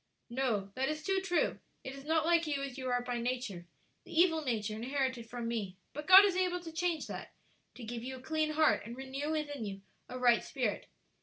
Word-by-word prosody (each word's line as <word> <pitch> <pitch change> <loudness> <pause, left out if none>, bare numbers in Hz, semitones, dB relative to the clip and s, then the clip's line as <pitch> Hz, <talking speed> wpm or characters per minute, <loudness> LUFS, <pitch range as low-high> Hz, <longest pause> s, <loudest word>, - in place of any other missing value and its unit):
"No, 230 -6 0
that 265 +4 0
is 310 0 -3
too 385 +1 +1
true; 365 -2 +1 0.2
it 265 - -6
is 275 0 -10
not 320 0 +2
like 335 -1 +3
you 280 -2 -1
as 275 -3 -5
you 260 -2 -4
are 245 0 +1
by 245 -1 -2
nature 235 -8 -3 0.4
the 320 - -2
evil 330 -3 +5
nature 220 -5 -1
inherited 255 0 -2
from 240 -1 -4
me; 205 -6 -3 0.2
but 300 +1 -6
God 380 +2 +11
is 390 -3 +1
able 365 -1 +1
to 330 -1 -8
change 335 0 -1
that, - - -7 0.4
to 250 - -9
give 230 +1 -5
you 260 +1 -5
a - - -9
clean 310 +3 -1
heart 310 0 +4
and 235 +3 -8
renew 270 +2 -4
within 295 -5 -2
you 195 -2 -5 0.3
a 255 - -5
right 245 -2 +4
spirit. 245 -7 -2
265 Hz, 220 wpm, -33 LUFS, 240-315 Hz, 0.4 s, God